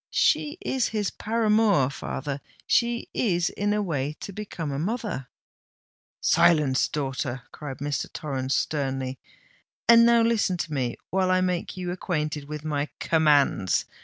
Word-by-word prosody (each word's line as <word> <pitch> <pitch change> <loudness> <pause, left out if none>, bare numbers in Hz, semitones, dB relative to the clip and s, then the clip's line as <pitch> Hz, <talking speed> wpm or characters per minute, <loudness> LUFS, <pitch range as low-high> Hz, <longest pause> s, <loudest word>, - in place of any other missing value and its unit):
She 300 +3 +2
is 265 - 0
his 210 -3 -1
paramour, 215 - +2
father—she 150 - -2
is 175 -7 +1
in 205 0 -1
a 210 0 +1
way 150 -5 -2
to 200 - -6
become 180 -7 -5
a 135 - -3
mother——" 210 - -3 0.9
"Silence, 150 -6 +4
daughter!" 135 -3 -3
cried 145 -3 -7
Mr. 145 0 -3
Torrens, 135 -3 -2
sternly. 135 -3 -2 0.7
"And 235 0 +8
now 235 0 +5
listen 220 -5 +2
to 155 -2 -4
me, 125 -4 -1 0.2
while 185 0 +2
I 185 0 +3
make 180 0 -2
you 180 -1 -3
acquainted 155 -5 -2
with 150 0 -6
my 145 -1 -1
commands! 145 - +3
160 Hz, 135 wpm, -26 LUFS, 140-205 Hz, 0.9 s, And